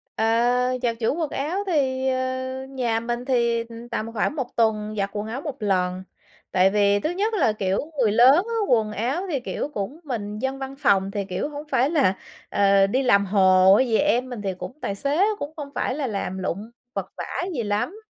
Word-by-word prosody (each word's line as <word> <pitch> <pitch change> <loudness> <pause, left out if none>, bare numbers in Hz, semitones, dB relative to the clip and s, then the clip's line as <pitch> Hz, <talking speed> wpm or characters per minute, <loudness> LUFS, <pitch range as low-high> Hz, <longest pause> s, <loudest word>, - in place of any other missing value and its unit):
À, 245 +3 +2
giặt 235 -2 0
giũ 225 +4 +1
quần 315 -4 -1
áo 315 +8 -2
thì, 265 -5 +1
ờ, 260 0 -2
nhà 240 -4 -1
mình 240 +1 -3
thì, 235 -3 +1
ừm, 230 +1 -10
tầm 225 0 -3
khoảng 235 +7 0
1 265 -4 -2
tuần 215 -2 +1
giặt 200 0 0
quần 210 +1 -3
áo 245 +5 -4
1 295 -4 -5
lần. 185 -2 0 0.5
Tại 185 +1 +4
vì 205 0 +3
thứ 310 - -1
nhất 410 +5 -1
là, 280 - +2
kiểu, 195 -2 -1 0.2
người 225 -5 +3
lớn 245 +5 +7
á, 465 - -3
quần 220 -3 +2
áo 245 - -1
thì, 285 - 0
kiểu, 265 +3 -4
cũng 210 +10 -4
mình 210 -6 -4
dân 265 +2 -2
văn 270 0 -6
phòng 195 -7 +2
thì, 200 -1 -3
kiểu, 190 +9 -3
hổng 295 0 -8
phải 265 +1 +2
là, 280 - +3 0.4
ờ, 195 -1 +4
đi 260 +6 0
làm 200 -5 +4
hồ 190 -1 +5
hay 260 +3 +3
gì, 225 - +2
em 255 -4 +1
mình 240 -4 -6
thì 195 -2 -2
cũng 255 +10 -9
tài 200 - -2
tế 300 +8 +3
cũng 290 +2 -5
không 290 -3 -6
phải 255 - -1
là 285 -3 -2
làm 195 -3 -3
lụng 195 +4 -4 0.2
vật - - -3
vã - - -4 0.3
gì 235 - -1
lắm, 210 - -1
235 Hz, 215 wpm, -24 LUFS, 205-270 Hz, 0.5 s, lớn